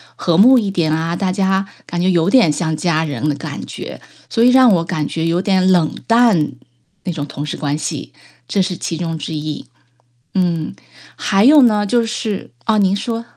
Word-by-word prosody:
和 170 Hz, -2 st, 0 dB
睦 250 Hz, +5 st, +7 dB
一 205 Hz, -3 st, -2 dB
点 170 Hz, -5 st, 0 dB
啊， 165 Hz, +2 st, -1 dB
大 185 Hz, 0 st, -1 dB
家 190 Hz, 0 st, 0 dB, 0.2 s
感 175 Hz, -, -4 dB
觉 185 Hz, +1 st, +2 dB
有 170 Hz, +1 st, +2 dB
点 235 Hz, -12 st, +4 dB
像 160 Hz, +1 st, -2 dB
家 160 Hz, -1 st, 0 dB
人 145 Hz, 0 st, -3 dB
的 -, -, +1 dB
感 -, -, -7 dB
觉。 -, -, -8 dB, 0.3 s
所 230 Hz, -, +1 dB
以 250 Hz, -, +6 dB
让 255 Hz, -2 st, +6 dB
我 170 Hz, -2 st, +1 dB
感 155 Hz, -3 st, -3 dB
觉 165 Hz, 0 st, -3 dB
有 170 Hz, +2 st, +1 dB
点 190 Hz, -1 st, +2 dB
冷 170 Hz, -4 st, +2 dB
淡， 230 Hz, -11 st, +3 dB, 0.5 s
那 180 Hz, -, -2 dB
种 145 Hz, -3 st, -4 dB
同 145 Hz, 0 st, -6 dB
事 150 Hz, -, -4 dB
关 145 Hz, 0 st, -2 dB
系， 150 Hz, -, -5 dB, 0.4 s
这 195 Hz, +10 st, 0 dB
是 185 Hz, -1 st, -2 dB
其 165 Hz, -1 st, -4 dB
中 165 Hz, -1 st, -3 dB
之 160 Hz, -, -6 dB
一， 150 Hz, -2 st, -5 dB, 0.7 s
嗯， 170 Hz, -4 st, -1 dB, 0.4 s
还 195 Hz, +4 st, +1 dB
有 295 Hz, +1 st, +7 dB
呢 210 Hz, -4 st, +3 dB
就 235 Hz, +3 st, +1 dB
是 220 Hz, -3 st, -4 dB
啊， 220 Hz, -1 st, +1 dB
您 195 Hz, 0 st, +2 dB
说。 230 Hz, +2 st, -4 dB
180 Hz, 215 characters per minute, -17 LUFS, 160-205 Hz, 0.7 s, 睦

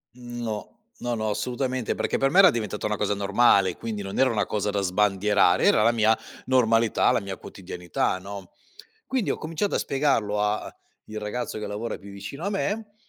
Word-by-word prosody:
No, 120 Hz, -3 st, -6 dB, 0.2 s
no, 120 Hz, 0 st, -3 dB
no, 110 Hz, -1 st, -1 dB
assolutamente, 125 Hz, +2 st, -2 dB
perché -, -, -1 dB
per 135 Hz, -, +2 dB
me 190 Hz, -, +5 dB
era 190 Hz, -3 st, +8 dB
diventata 105 Hz, -4 st, -3 dB
una 105 Hz, 0 st, 0 dB
cosa 105 Hz, -, 0 dB
normale, 100 Hz, -2 st, +3 dB
quindi 110 Hz, -3 st, -4 dB
non 95 Hz, +3 st, -5 dB
era 135 Hz, -, +5 dB
una 105 Hz, -4 st, 0 dB
cosa 105 Hz, -1 st, -1 dB
da 100 Hz, -1 st, 0 dB
sbandierare, 100 Hz, -1 st, +2 dB
era 105 Hz, -, +5 dB
la 115 Hz, +2 st, +4 dB
mia 110 Hz, -1 st, +3 dB, 0.3 s
normalità, 115 Hz, -3 st, +3 dB
la -, -, +1 dB
mia 95 Hz, -1 st, -6 dB
quotidianità 90 Hz, -1 st, -3 dB
no, 100 Hz, -1 st, -9 dB, 0.5 s
quindi 260 Hz, -5 st, -1 dB
ho -, -, -3 dB
cominciato 165 Hz, +6 st, -2 dB
a -, -, +2 dB
spiegarlo 115 Hz, -7 st, 0 dB
a 105 Hz, +1 st, -1 dB, 0.3 s
il 110 Hz, 0 st, -6 dB
ragazzo 105 Hz, +2 st, -4 dB
che 105 Hz, -, -4 dB
lavora 110 Hz, +3 st, -4 dB
più 100 Hz, 0 st, -12 dB
vicino 100 Hz, -, -7 dB
a 200 Hz, -, -1 dB
me 205 Hz, +1 st, -2 dB
110 Hz, 190 wpm, -25 LUFS, 100-125 Hz, 0.5 s, era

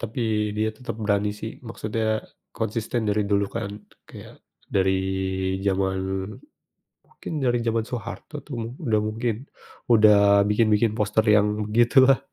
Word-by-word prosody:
Tapi 115 Hz, +3 st, -5 dB, 0.4 s
dia 110 Hz, +1 st, +1 dB
tetap 110 Hz, -1 st, -7 dB
berani 105 Hz, -1 st, 0 dB
sih. 110 Hz, +2 st, -8 dB
Maksudnya 110 Hz, -1 st, -2 dB, 0.3 s
konsisten 110 Hz, +1 st, -2 dB
dari 105 Hz, 0 st, +1 dB
dulu 100 Hz, 0 st, +3 dB
kan, 110 Hz, -3 st, -3 dB, 0.4 s
kayak -, -, -12 dB, 0.3 s
dari 95 Hz, -1 st, +1 dB, 0.7 s
zaman 95 Hz, -1 st, +1 dB, 1.0 s
mungkin -, -, -10 dB
dari 120 Hz, -1 st, +2 dB
zaman 115 Hz, -1 st, +1 dB
Soeharto 125 Hz, +5 st, -7 dB
tuh 140 Hz, -, -7 dB, 0.2 s
udah 110 Hz, -2 st, +1 dB
mungkin, 110 Hz, +1 st, -1 dB, 0.5 s
udah 100 Hz, -3 st, +6 dB
bikin-bikin 110 Hz, 0 st, +3 dB
poster 105 Hz, +1 st, +1 dB
yang 105 Hz, 0 st, +3 dB
begitulah. 125 Hz, +4 st, +5 dB
110 Hz, 120 wpm, -24 LUFS, 105-115 Hz, 1.0 s, udah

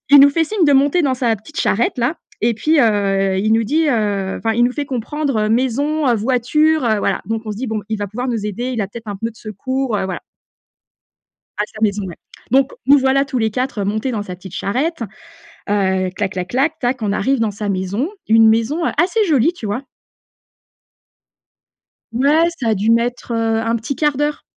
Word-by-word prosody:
Il 285 Hz, -, +9 dB
nous 280 Hz, +1 st, +9 dB
fait 325 Hz, +3 st, +1 dB
signe 380 Hz, +2 st, 0 dB
de 290 Hz, -, +4 dB
monter 285 Hz, +5 st, +3 dB
dans 270 Hz, -3 st, +1 dB
sa 240 Hz, -3 st, 0 dB
petite 220 Hz, +9 st, -7 dB
charrette-là 240 Hz, -, 0 dB, 0.3 s
et 230 Hz, 0 st, +2 dB
puis 305 Hz, +6 st, +2 dB
heu, 195 Hz, -3 st, +2 dB
il 215 Hz, +3 st, +1 dB
nous 225 Hz, 0 st, +3 dB
dit, 310 Hz, +8 st, +1 dB
heu 205 Hz, -6 st, 0 dB
enfin 225 Hz, -1 st, -1 dB
il 240 Hz, -, +3 dB
nous 250 Hz, -, +1 dB
fait 290 Hz, 0 st, -3 dB
comprendre: 255 Hz, -3 st, -1 dB
«maison», 265 Hz, +5 st, +1 dB
heu 240 Hz, -, +4 dB
«voiture» 265 Hz, +6 st, +2 dB
heu, 220 Hz, -2 st, +2 dB
voilà, -, -, 0 dB
donc 225 Hz, +1 st, -2 dB
on 215 Hz, -, -4 dB
se -, -, -8 dB
dit: 255 Hz, +3 st, -4 dB
«Bon, 220 Hz, -1 st, -2 dB
il 220 Hz, -, -1 dB
va 205 Hz, -, -2 dB
pouvoir 245 Hz, +5 st, -4 dB
nous 225 Hz, -4 st, -2 dB
aider, 240 Hz, +5 st, -3 dB
il 240 Hz, -3 st, -2 dB
a 195 Hz, -, -1 dB
peut-être 230 Hz, +2 st, -10 dB
un 200 Hz, -, -4 dB
peu 230 Hz, +3 st, -3 dB
de 220 Hz, -, -20 dB
secours», 260 Hz, +6 st, -3 dB
voilà, 205 Hz, -4 st, -1 dB
voilà 185 Hz, -, -4 dB, 1.4 s
À 210 Hz, -, +1 dB
sa 215 Hz, 0 st, -13 dB
maison, 205 Hz, -1 st, +1 dB
ouais. 175 Hz, -3 st, -7 dB, 0.4 s
Donc 270 Hz, +1 st, +3 dB
nous 285 Hz, +2 st, +7 dB
voilà, 270 Hz, +1 st, +2 dB
tous 260 Hz, -2 st, -2 dB
les 220 Hz, -1 st, +1 dB
4, 255 Hz, -1 st, -2 dB
heu, -, -, 0 dB
montés 220 Hz, +6 st, -1 dB
dans 215 Hz, -3 st, -2 dB
sa 180 Hz, -2 st, -7 dB
petite 185 Hz, 0 st, -12 dB
charrette, 275 Hz, +9 st, -2 dB, 0.7 s
heu, 190 Hz, -2 st, +1 dB
clac, 195 Hz, 0 st, -3 dB
clac, 180 Hz, -1 st, -4 dB
clac, 300 Hz, +7 st, 0 dB
tac. 245 Hz, -1 st, -1 dB
On 200 Hz, -1 st, 0 dB
arrive 270 Hz, +5 st, +1 dB
dans 215 Hz, -2 st, 0 dB
sa 205 Hz, 0 st, -5 dB
maison, 200 Hz, -, -1 dB, 0.2 s
une 225 Hz, 0 st, +6 dB
maison 230 Hz, +10 st, +1 dB
assez 375 Hz, +7 st, +2 dB
jolie, 305 Hz, 0 st, +3 dB
tu 340 Hz, -, -11 dB
vois? 225 Hz, +6 st, -2 dB, 2.3 s
Ouais, 285 Hz, +7 st, +3 dB
ça 235 Hz, -, 0 dB
a 220 Hz, -, +3 dB
dû 205 Hz, +3 st, 0 dB
mettre, 235 Hz, +1 st, 0 dB
heu, 225 Hz, -1 st, +1 dB
1 230 Hz, +1 st, 0 dB
petit 235 Hz, +5 st, -3 dB
1/4 295 Hz, -1 st, +1 dB
d'heure. 295 Hz, +1 st, -1 dB
230 Hz, 215 wpm, -18 LUFS, 210-275 Hz, 2.3 s, Il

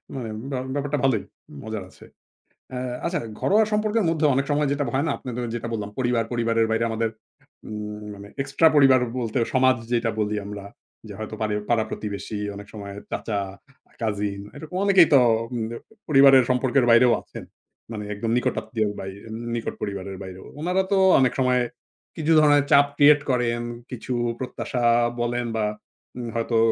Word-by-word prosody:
মানে 125 Hz, -4 st, -4 dB
উম 110 Hz, -, -7 dB
ব্যা 130 Hz, -, -1 dB, 0.2 s
ব্যাপারটা 145 Hz, +1 st, -1 dB
ভালোই, 130 Hz, -6 st, +2 dB, 0.4 s
মজার 110 Hz, -2 st, -5 dB
আছে। -, -, -16 dB, 0.7 s
অ্যা 125 Hz, -, -4 dB, 0.2 s
আচ্ছা 175 Hz, +1 st, 0 dB, 0.2 s
ঘরোয়া 215 Hz, +3 st, +4 dB
সম্পর্কের 215 Hz, 0 st, +1 dB
মধ্যে 160 Hz, -1 st, +1 dB
অনেক 135 Hz, +1 st, +1 dB
সময় 145 Hz, 0 st, +2 dB
যেটা 145 Hz, 0 st, 0 dB
হয় 140 Hz, -, +1 dB
না? 145 Hz, -, +1 dB
আপনাদের 125 Hz, -1 st, -5 dB
যেটা 120 Hz, 0 st, -4 dB
বললাম 105 Hz, -2 st, -3 dB
পরিবার, 120 Hz, -2 st, +1 dB
পরিবারের 115 Hz, -1 st, +1 dB
বাইরে 115 Hz, +1 st, +1 dB
আমাদের 115 Hz, 0 st, -1 dB, 0.6 s
উম 105 Hz, 0 st, -6 dB
মানে 100 Hz, 0 st, -11 dB
এক্সট্রা 160 Hz, +4 st, +3 dB
পরিবার 135 Hz, -3 st, +6 dB, 0.2 s
বলতে 115 Hz, 0 st, -2 dB, 0.2 s
সমাজ 130 Hz, 0 st, +4 dB, 0.2 s
যেইটা 115 Hz, -2 st, +1 dB
বলি 105 Hz, 0 st, 0 dB
আমরা। 100 Hz, -1 st, -7 dB, 0.4 s
যে -, -, -8 dB
হয়তো -, -, -5 dB
পারি 105 Hz, -1 st, 0 dB, 0.2 s
পাড়া-প্রতিবেশী 110 Hz, -2 st, -2 dB, 0.2 s
অনেক 100 Hz, 0 st, -9 dB
সময় 100 Hz, -2 st, -7 dB, 0.2 s
চাচা, 105 Hz, -3 st, -2 dB, 0.6 s
কাজিন 105 Hz, -2 st, -2 dB
এরকম 155 Hz, +4 st, -9 dB
অনেকেই 190 Hz, -4 st, +6 dB
তো 140 Hz, -, +8 dB, 0.3 s
উম 120 Hz, -2 st, -2 dB
ব -, -, -8 dB, 0.4 s
পরিবারের 135 Hz, -3 st, +7 dB
সম্পর্কের 125 Hz, 0 st, +2 dB
বাইরেও 120 Hz, +1 st, +6 dB
আছেন। -, -, -10 dB, 0.5 s
মানে 105 Hz, -2 st, -5 dB
একদম 110 Hz, +2 st, -3 dB
নিকট -, -, 0 dB
আত্মীয়র 110 Hz, -3 st, -2 dB
বাইর 95 Hz, 0 st, -7 dB, 0.4 s
নিকট 115 Hz, -, -3 dB
পরিবারের 100 Hz, -1 st, -4 dB
বাইরেও। 95 Hz, 0 st, -9 dB, 0.2 s
উনারা 180 Hz, +3 st, +1 dB
তো 195 Hz, -, +4 dB, 0.2 s
অনেক 130 Hz, -2 st, +3 dB
সময় 125 Hz, -1 st, +3 dB, 0.5 s
কিছু 160 Hz, 0 st, -1 dB
ধরনের 145 Hz, -2 st, +5 dB
চাপ 140 Hz, 0 st, +7 dB
ক্রিয়েট 145 Hz, 0 st, +6 dB
করেন। 120 Hz, -1 st, 0 dB, 0.3 s
কিছু 125 Hz, +1 st, -5 dB, 0.3 s
প্রত্যাশা 125 Hz, -1 st, -4 dB, 0.4 s
বলেন 120 Hz, 0 st, -1 dB
বা 110 Hz, -1 st, +1 dB, 0.5 s
উম 120 Hz, -1 st, -5 dB
হয়তো 115 Hz, 0 st, 0 dB
120 Hz, 165 wpm, -24 LUFS, 110-140 Hz, 0.7 s, তো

